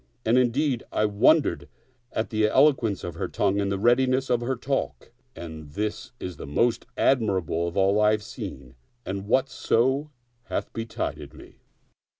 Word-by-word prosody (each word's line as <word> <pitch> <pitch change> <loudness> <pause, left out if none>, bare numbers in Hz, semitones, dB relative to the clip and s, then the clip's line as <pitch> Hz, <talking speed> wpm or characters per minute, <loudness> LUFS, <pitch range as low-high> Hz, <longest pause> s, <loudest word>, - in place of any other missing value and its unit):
And 115 - +3
indeed 130 +1 +1
I 105 - +1
wondered 120 +10 +3 0.4
at 110 - -2
the 110 -1 +2
eloquence 115 - +3
of - - -4
her - - -3
tongue 100 0 0
afid 100 - -1
the 100 - 0
readi 120 +5 +3
ness 130 +1 0
of 120 -1 +2
her 130 +2 -1
talk; 135 +1 -3 0.2
and 80 -3 -9
this 105 +5 -3
is 90 -3 -6
the - - -8
most 115 +11 +1
admirable 95 - +1
of 85 - -5
all 100 +2 +3
I 105 - +5
have 105 0 0
seen 100 - -8 0.3
and 95 +1 -3
of 95 - -9
whatso 130 +3 +1 0.4
hath - - -4
betided 115 0 -5
me. - - -15
110 Hz, 165 wpm, -25 LUFS, 100-125 Hz, 0.4 s, I